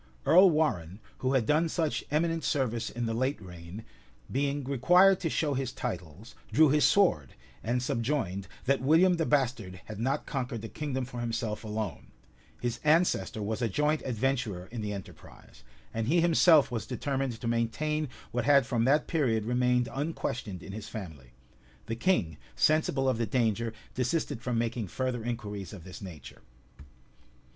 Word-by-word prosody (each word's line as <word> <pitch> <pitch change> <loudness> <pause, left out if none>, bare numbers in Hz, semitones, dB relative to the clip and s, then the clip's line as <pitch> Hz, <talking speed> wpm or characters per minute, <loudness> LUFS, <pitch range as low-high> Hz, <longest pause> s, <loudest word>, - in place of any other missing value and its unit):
Earl 185 +3 +7
Warrenne, 100 - 0 0.2
who 130 +1 0
had 125 -4 +2
done 155 +5 +2
such 160 -2 -1
eminent 165 +2 0
service 125 -6 0
in 120 0 -3
the 115 - -1
late 130 +5 0
reign, 90 +2 -10 0.5
being 140 +1 0
required 180 +9 +5
to 165 - -1
show 150 -1 0
his 130 -2 -2
titles, 95 +4 -6 0.2
drew 150 +7 +6
his 150 +1 +4
sword; 175 - +3 0.3
and 120 +3 0
subjoined, 115 -7 -1 0.2
that 135 0 +2
William 170 +6 +4
the 165 - 0
bastard 120 -10 0
had 110 -1 -8
not 130 +4 -1
conquered 125 -5 -4
the - - -4
kingdom 135 -4 -3
for 125 -1 -7
himself 115 -2 -3
alone: 105 -3 -4 0.5
his 120 -1 -2
ancestor 155 -8 +2
was 110 +3 -3
a 115 - +1
joint 150 +7 +1
adventurer 120 -6 -1
in 120 -2 -5
the 105 -1 -3
enterprise; 100 -2 -11 0.3
and 115 0 -2
he 170 +6 +3
himself 165 -4 +5
was 115 -2 -3
determined 135 -2 -2
to 115 - -4
maintain 135 +6 -1 0.2
what 120 -1 -1
had 140 -2 +5
from 115 -1 0
that 145 +3 +3
period 120 - 0
remained 125 0 +2
unquestioned 125 - -3
in - - -8
his 105 +1 -7
family. 80 - -8 0.6
The 115 - -3
king, 115 - +1 0.2
sensible 155 -3 +2
of 130 -3 +1
the 115 - 0
danger, 115 -3 0 0.2
desisted 135 -1 -1
from 125 -1 -1
making 115 -2 -1
further 125 +5 -2
inquiries 105 -5 -5
of 95 -5 -9
this 95 +1 -10
nature. 80 -10 -10
125 Hz, 165 wpm, -29 LUFS, 110-145 Hz, 0.6 s, Earl